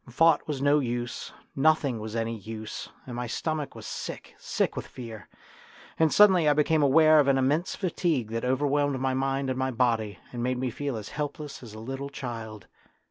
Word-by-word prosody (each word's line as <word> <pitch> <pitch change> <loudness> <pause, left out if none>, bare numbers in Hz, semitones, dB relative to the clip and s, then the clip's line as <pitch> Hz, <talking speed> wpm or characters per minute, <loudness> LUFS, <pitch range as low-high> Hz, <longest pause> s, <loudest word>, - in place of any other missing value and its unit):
Thought 160 +5 +3
was 140 -3 -3
no 145 +1 +5
use, 120 -2 -3 0.2
nothing 140 -4 +2
was 110 +1 -6
any 115 0 -1
use, 110 +1 -7 0.2
and 125 - -7
my 120 0 -3
stomach 155 +4 -3
was - - -9
sick, - - -6
sick - - -1
with - - -5
fear. 115 -4 -9 0.7
And 160 -1 +4
suddenly 185 -7 +6
I - - +5
became 150 +1 +2
aware 155 +2 +6
of 145 - +4
an 135 -1 +4
immense 145 +7 +1
fatigue 165 - -1
that 115 0 -2
overwhelmed 140 +1 +1
my 130 0 0
mind 135 0 0
and 130 - -3
my 130 0 +1
body, 115 -4 0 0.2
and 120 - -4
made 125 +1 0
me 125 -1 -1
feel 140 -1 -3
as 110 - -7
helpless 145 -1 -5
as 110 -4 -10
a - - -8
little 135 +4 -5
child. 115 -7 -6
135 Hz, 190 wpm, -27 LUFS, 120-145 Hz, 0.7 s, suddenly